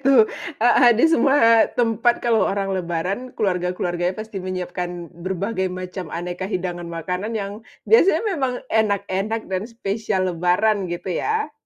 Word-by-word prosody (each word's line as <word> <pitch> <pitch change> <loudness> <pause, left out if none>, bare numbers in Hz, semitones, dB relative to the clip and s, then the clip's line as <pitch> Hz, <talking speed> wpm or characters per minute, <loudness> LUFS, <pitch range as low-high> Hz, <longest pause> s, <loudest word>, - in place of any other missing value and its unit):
itu 265 -4 +6 0.4
heeh, 245 0 +6
di 245 - +4
semua 230 -7 +5
tempat 235 0 +1
kalau 230 -2 +3
orang 195 0 -1
lebaran, 185 +6 -2
keluarga-keluarganya 180 -2 -1
pasti 215 -3 -6
menyiapkan 180 -1 -5
berbagai 190 +3 -2
macam 185 -1 -6
aneka 175 +3 -4
hidangan 175 -3 -3
makanan 180 +6 -3
yang 200 +1 -5 0.2
biasanya 390 -7 +5
memang 265 -6 -1 0.2
enak-enak 210 0 0
dan 190 0 -2
spesial 200 -4 -2
lebaran 185 +3 +1
gitu 175 +1 -4
ya. 435 -7 -1
195 Hz, 130 wpm, -22 LUFS, 180-225 Hz, 0.4 s, itu